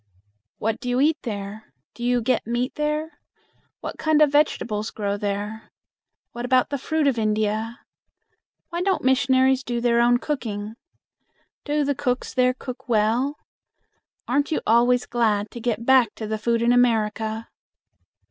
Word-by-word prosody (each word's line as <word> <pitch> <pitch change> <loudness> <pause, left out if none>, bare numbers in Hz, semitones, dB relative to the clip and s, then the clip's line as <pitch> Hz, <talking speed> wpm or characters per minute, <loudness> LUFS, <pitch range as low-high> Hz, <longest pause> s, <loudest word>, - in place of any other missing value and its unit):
"What 220 +1 -2
do 250 - -5
you 245 +1 +1
eat 305 +3 +3
there? 205 - -7 0.2
Do 240 - -9
you 245 -1 +1
get 245 -2 0
meat 240 +3 -1
there? 300 +2 -2 0.6
What - - -6
kind 315 -1 +2
of 300 -2 +5
vegetables 230 -7 +1
grow 200 -2 -2
there? 205 +2 -4 0.6
What 240 - -6
about 255 +1 +2
the 280 - -2
fruit 315 +3 0
of 265 -5 +2
India? 215 +2 -1 0.9
Why 345 +1 -2
don't 380 0 0
missionaries 260 0 +3
do 240 -1 -2
their 235 0 +3
own 240 0 +4
cooking? 220 -7 -4 0.9
Do 295 0 +1
the 285 - +1
cooks 255 -2 -2
there 255 -1 +2
cook 255 0 -9
well? 235 +6 +1 0.9
Aren't 280 +4 +1
you - - 0
always 245 +2 +3
glad 215 -3 0
to 240 - -8
get 230 -1 -2
back 255 -4 +4
to 220 - -6
the 215 0 -3
food 235 +1 0
in 240 +1 +4
America?" 225 -2 +1
240 Hz, 155 wpm, -23 LUFS, 220-265 Hz, 0.9 s, of